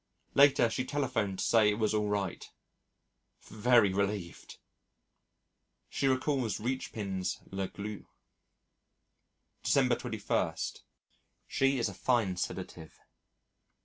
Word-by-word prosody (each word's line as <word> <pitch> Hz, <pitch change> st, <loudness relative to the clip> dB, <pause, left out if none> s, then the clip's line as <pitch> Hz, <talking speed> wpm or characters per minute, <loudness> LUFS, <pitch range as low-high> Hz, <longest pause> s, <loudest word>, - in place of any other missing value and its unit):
Later 140 Hz, -4 st, +6 dB
she 115 Hz, +3 st, -2 dB
telephoned 125 Hz, -8 st, -1 dB
to -, -, -1 dB
say 110 Hz, -3 st, +5 dB
it 105 Hz, -, 0 dB
was 110 Hz, -1 st, +1 dB
all 105 Hz, -1 st, 0 dB
right. 100 Hz, -3 st, -3 dB, 0.9 s
Very 110 Hz, -3 st, +3 dB
relieved!... 100 Hz, -3 st, -3 dB, 1.3 s
She 140 Hz, -, 0 dB
recalls 130 Hz, -3 st, 0 dB
Richepin's 105 Hz, -6 st, -3 dB
La 95 Hz, 0 st, -2 dB
Glu. 105 Hz, +1 st, -7 dB, 1.5 s
December -, -, +3 dB
21. -, -, -1 dB, 0.9 s
She 135 Hz, 0 st, +1 dB
is 115 Hz, -, +1 dB
a 100 Hz, -, -6 dB
fine 110 Hz, -3 st, +1 dB
sedative. 85 Hz, -2 st, -6 dB
105 Hz, 100 wpm, -31 LUFS, 100-125 Hz, 1.5 s, Later